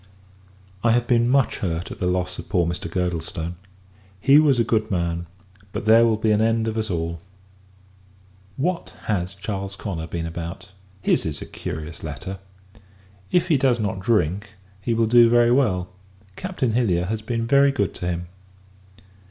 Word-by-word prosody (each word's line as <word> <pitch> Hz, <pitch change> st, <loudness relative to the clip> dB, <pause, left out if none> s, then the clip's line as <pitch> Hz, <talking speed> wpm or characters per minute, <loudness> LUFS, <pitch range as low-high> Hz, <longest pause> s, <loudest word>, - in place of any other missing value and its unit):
I 115 Hz, -1 st, +4 dB
have 120 Hz, 0 st, +2 dB
been 120 Hz, -1 st, +3 dB
much 135 Hz, -3 st, +2 dB
hurt 85 Hz, -2 st, -3 dB
at -, -, -8 dB
the 90 Hz, -, 0 dB
loss 90 Hz, 0 st, -1 dB
of 85 Hz, -, -9 dB
poor 90 Hz, -2 st, +2 dB
Mr. 85 Hz, 0 st, -3 dB
Girdlestone! 85 Hz, -1 st, -2 dB, 0.7 s
He 140 Hz, +8 st, +6 dB
was 145 Hz, -5 st, +4 dB
a -, -, +5 dB
good 110 Hz, -1 st, 0 dB
man; 85 Hz, -2 st, -1 dB, 0.5 s
but -, -, -4 dB
there 115 Hz, +2 st, +7 dB
will 110 Hz, -1 st, +2 dB
be 110 Hz, 0 st, +1 dB
an 105 Hz, 0 st, +3 dB
end 115 Hz, 0 st, +2 dB
of 110 Hz, -, -2 dB
us 110 Hz, -1 st, -2 dB
all. 85 Hz, -1 st, -2 dB, 1.4 s
What 170 Hz, +5 st, -2 dB
has 95 Hz, -3 st, -2 dB
Charles 100 Hz, 0 st, -4 dB
Connor 85 Hz, -5 st, -5 dB
been 85 Hz, -1 st, -4 dB
about? 85 Hz, +3 st, -6 dB, 0.3 s
His -, -, +2 dB
is 75 Hz, -2 st, -4 dB
a -, -, -9 dB
curious 80 Hz, +1 st, -7 dB
letter! 80 Hz, +6 st, -6 dB, 0.9 s
If 180 Hz, 0 st, +2 dB
he 155 Hz, -, +5 dB
does 130 Hz, -3 st, +2 dB
not 105 Hz, -2 st, -2 dB
drink, 100 Hz, 0 st, 0 dB, 0.3 s
he 115 Hz, +4 st, 0 dB
will 115 Hz, 0 st, +3 dB
do 120 Hz, +1 st, +6 dB
very 120 Hz, 0 st, +5 dB
well. 95 Hz, -9 st, +2 dB, 0.5 s
Captain 180 Hz, -, -2 dB
Hilliar 95 Hz, -8 st, +2 dB
has 110 Hz, +3 st, -3 dB
been 115 Hz, +1 st, -2 dB
very 140 Hz, +3 st, +5 dB
good 100 Hz, -10 st, -1 dB
to 90 Hz, -, -5 dB
him. 90 Hz, 0 st, -2 dB
105 Hz, 170 wpm, -23 LUFS, 85-120 Hz, 1.4 s, there